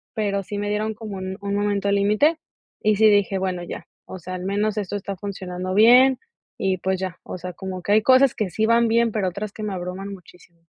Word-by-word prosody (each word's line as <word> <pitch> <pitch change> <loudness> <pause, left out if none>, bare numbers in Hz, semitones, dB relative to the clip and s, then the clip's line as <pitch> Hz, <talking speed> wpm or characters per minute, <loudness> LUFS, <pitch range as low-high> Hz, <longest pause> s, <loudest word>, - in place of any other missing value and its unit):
Pero 200 -3 0
sí 205 - -6
me 205 0 -2
dieron 215 +1 -1
como 210 -3 -7
un 190 +1 -5
un 200 0 -3
momento 205 -1 0
límite, 210 +11 +2 0.4
y 215 0 +3
sí 215 +1 +5
dije: 205 -1 +2
"Bueno, 185 -2 -2
ya. - - -7 0.2
O 190 - -9
sea, 185 +2 -8
al 180 - -6
menos 205 +2 -1
esto 205 -1 -3
está 200 -1 -4
funcionando 185 -2 -5
bien". 250 +5 +7 0.4
Y, 190 -1 0
pues, 190 0 -1
ya. 185 -2 -4
O - - -7
sea, 180 +1 -7
como 185 -1 -6
que 200 - -2
hay 215 +1 +5
cosas 260 +3 +5
que 210 -4 -2
sí 220 +6 0
van 230 +1 +4
bien, 230 0 +2
pero 205 -3 -1
otras 200 +3 -6
que 215 - -9
me 210 -2 -3
abruman 180 +2 -5
muchísimo. 175 -2 -17
200 Hz, 230 wpm, -23 LUFS, 185-215 Hz, 0.4 s, bien